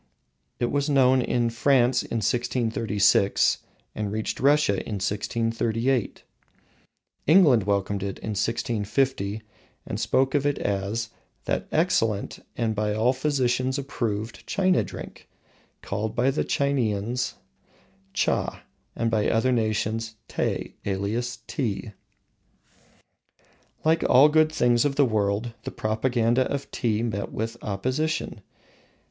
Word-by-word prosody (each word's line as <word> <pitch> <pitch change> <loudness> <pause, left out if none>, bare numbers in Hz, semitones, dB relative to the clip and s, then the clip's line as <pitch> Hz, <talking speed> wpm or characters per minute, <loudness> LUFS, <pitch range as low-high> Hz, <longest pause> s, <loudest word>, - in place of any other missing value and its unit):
It 120 - 0
was 145 +1 0
known 130 -2 +4
in 120 -1 0
France 125 0 +3
in 115 - -3
1636, 115 -4 +2 0.3
and 105 -2 -3
reached 110 +1 -3
Russia 140 -7 +3
in 105 - -4
1638. 115 +4 -1 1.0
England 150 - +6
welcomed 100 0 0
it 95 0 -4
in 110 - -5
1650 110 0 -1 0.4
and - - -4
spoke 135 0 +1
of 145 -2 +2
it 145 -1 +1
as 100 +3 -2 0.4
"That - - -1
excellent 115 - +1 0.2
and 115 -2 0
by 105 0 -1
all 115 +4 +3
physicians 130 -1 0
approved 115 -5 -4
China 185 -2 +2
drink, - - -10 0.5
called 110 +2 -3
by 125 +3 +2
the 140 - -1
Chineans 125 -4 0 0.8
Tcha, - - 0 0.3
and 115 -1 0
by 110 -2 +2
other 120 +3 +2
nations 110 -1 -1
Tay, - - -2
alias 110 +5 -2
Tee." 110 -4 -3 1.9
Like 160 +1 +3
all 140 +4 +7
good 155 0 +4
things 120 -5 +3
of 145 -2 0
the 140 - +4
world, 110 0 0
the - - -5
propaganda 120 +2 0
of 140 -1 -4
Tea 110 -2 0
met 105 -4 -3
with 115 +2 -3
opposition. 130 +4 -2
115 Hz, 120 wpm, -25 LUFS, 110-130 Hz, 1.9 s, all